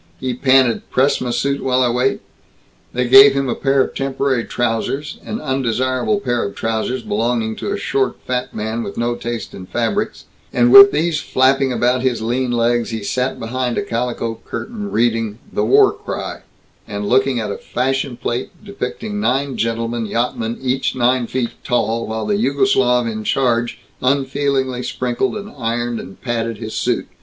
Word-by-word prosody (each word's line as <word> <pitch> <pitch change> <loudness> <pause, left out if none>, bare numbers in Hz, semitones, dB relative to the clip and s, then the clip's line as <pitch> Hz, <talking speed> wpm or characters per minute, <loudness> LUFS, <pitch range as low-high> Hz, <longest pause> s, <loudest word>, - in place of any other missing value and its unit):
He 130 -1 -2
panted 130 -2 +3
"Press 135 +3 +2
m' 125 -1 -2
suit 140 +3 0
while 130 0 +2
I 125 - +2
wait?" 125 +2 0 0.7
They 125 0 -1
gave 135 +2 +9
him 135 0 0
a 125 - 0
pair 135 -1 +2
of - - -6
temporary 135 -2 -1
trousers, 120 +5 -2
an 220 - -4
undesirable 130 - 0
pair 120 -11 -1
of 100 - -5
trousers 115 +3 -2
belonging 110 0 -1
to - - -3
a - - -1
short 130 -2 -1
fat 125 0 -2
man 110 +2 -3
with 100 - -6
no 120 +1 0
taste 120 -1 -5
in 90 -1 -9
fabrics, 115 +1 -2 0.3
and 120 0 +3
with 200 0 +11
these 160 +1 0
flapping 130 +1 +2
about 125 +1 +1
his 130 -2 0
lean 120 +3 -1
legs, 120 0 +1
he 110 -2 -4
sat 125 +5 -1
behind 125 +1 -2
a - - 0
calico 115 -1 -3
curtain, 210 -3 -5
reading 115 - 0 0.2
The 105 - +1
War - - +5
Cry - - -6 0.5
and 100 0 -4
looking 130 0 +2
at 105 -2 -3
a 100 - -4
"fashion 135 0 -2
plate" 120 +1 -3 0.2
depicting 205 +1 -4
nine 135 -6 0
gentlemen 115 0 -2
yachtsmen 115 0 -2
each 130 +1 0
nine 125 -1 +2
feet 120 -2 -2
tall, 115 -1 0
while 110 0 -3
the 205 -1 0
Jugoslav 130 -6 +2
in 110 -1 -4
charge 120 -1 +1 0.2
unfeelingly 135 -1 0
sprinkled 125 - -2
and 205 0 -8
ironed 120 -1 -2
and 95 - -10
patted 115 -2 -2
his 110 0 -6
suit. - - -1
125 Hz, 170 wpm, -19 LUFS, 115-135 Hz, 0.7 s, with